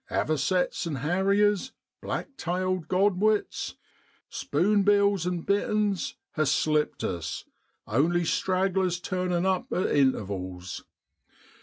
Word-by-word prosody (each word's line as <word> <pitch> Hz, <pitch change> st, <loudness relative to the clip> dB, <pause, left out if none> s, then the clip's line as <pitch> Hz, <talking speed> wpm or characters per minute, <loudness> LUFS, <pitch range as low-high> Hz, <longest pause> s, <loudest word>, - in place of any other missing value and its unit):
Avo 155 Hz, -, 0 dB
cets 180 Hz, +3 st, 0 dB
an' 155 Hz, -, -2 dB
harriers, 195 Hz, -, +1 dB, 0.3 s
black 275 Hz, -, -4 dB
tailed 185 Hz, -, -2 dB
godwits, 200 Hz, +3 st, +1 dB, 0.6 s
spune 200 Hz, +8 st, +1 dB
bills 200 Hz, -3 st, +3 dB
an' 180 Hz, -1 st, -1 dB
bitterns 205 Hz, 0 st, 0 dB, 0.2 s
ha' 155 Hz, -, 0 dB
slipped 150 Hz, +1 st, +1 dB
us, 85 Hz, -2 st, -3 dB, 0.4 s
only 165 Hz, +9 st, +1 dB
stragglers 185 Hz, 0 st, +1 dB
turnin' 180 Hz, -1 st, -1 dB
up 190 Hz, -1 st, 0 dB
at 185 Hz, -, 0 dB
intervals. 95 Hz, -9 st, -1 dB
180 Hz, 105 wpm, -27 LUFS, 155-195 Hz, 0.6 s, bills